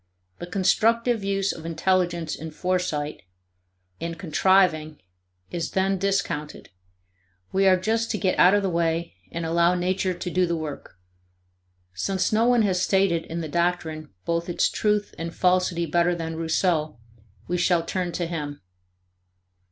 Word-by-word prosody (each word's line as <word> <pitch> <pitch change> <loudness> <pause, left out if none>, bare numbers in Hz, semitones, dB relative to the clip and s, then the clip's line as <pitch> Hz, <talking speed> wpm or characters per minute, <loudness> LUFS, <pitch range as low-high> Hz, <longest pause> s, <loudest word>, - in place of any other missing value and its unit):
The 175 - -6
constructive 225 +5 +2
use 195 0 0
of 160 - -10
intelligence 170 0 0
in 160 - -7
foresight, 160 -3 -2 0.8
and 165 0 -4
contriving, 165 -3 +2 0.5
is 170 -1 -3
then 190 0 +1
discounted; 175 -6 -2 0.8
we 195 0 +3
are 185 -1 +6
just 225 +4 0
to 215 - -1
get 190 -3 0
out 185 +3 +7
of 205 - +1
the 195 - +1
way 170 0 0 0.2
and 170 0 -4
allow 170 +2 +3
nature 185 +1 0
to 180 - -5
do 180 0 +2
the 170 - 0
work. 155 - -7 1.0
Since 190 - -1
no 225 +2 +3
one 245 -2 +4
has 185 -3 +1
stated 190 -4 +2
in 170 +1 -4
the 160 - -4
doctrine 165 -1 -1 0.2
both 170 +1 -1
its 175 - +2
truth 210 -1 0
and 165 0 -5
falsity 180 -2 +2
better 175 +2 +2
than 165 -1 -4
Rousseau, 160 -2 0 0.5
we 175 +1 -1
shall 175 -1 +2
turn 180 0 -2
to 175 - -2
him. 150 -4 -5
175 Hz, 150 wpm, -25 LUFS, 165-190 Hz, 1.0 s, out